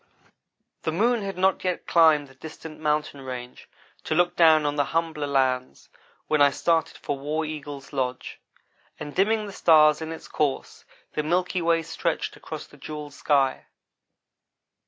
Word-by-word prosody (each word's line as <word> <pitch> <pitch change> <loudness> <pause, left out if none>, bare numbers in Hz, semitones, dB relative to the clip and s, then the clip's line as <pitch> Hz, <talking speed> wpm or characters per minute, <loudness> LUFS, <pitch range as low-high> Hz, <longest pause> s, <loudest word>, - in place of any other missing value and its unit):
The 160 - -1
moon 230 +7 +2
had 195 -2 -5
not 190 +1 +2
yet 180 -2 -2
climbed 160 -4 +4
the 135 - -17
distant 160 +2 -10
mountain 150 -2 -1
range 125 -2 -8 0.4
to 155 - -1
look 175 +1 +2
down 160 -3 +5
on 145 0 0
the 145 -1 +1
humbler 160 -3 -2
lands 130 -2 -1 0.4
when 155 -1 +1
I 145 - +7
started 165 +4 0
for 145 -2 -4
War 155 +3 -2
Eagle's 145 -2 -7
lodge; 130 -2 -3 0.6
and 150 -1 -7
dimming 215 +3 +2
the 205 - -7
stars 155 -4 +5
in 160 0 -5
its 165 - -8
course, 145 -3 -2 0.3
the 150 - 0
milky 180 +3 0
way 165 0 +2
stretched - - -2
across - - -8
the - - -18
jewelled 150 -1 -8
sky. 140 -2 +1
155 Hz, 155 wpm, -25 LUFS, 145-165 Hz, 0.6 s, I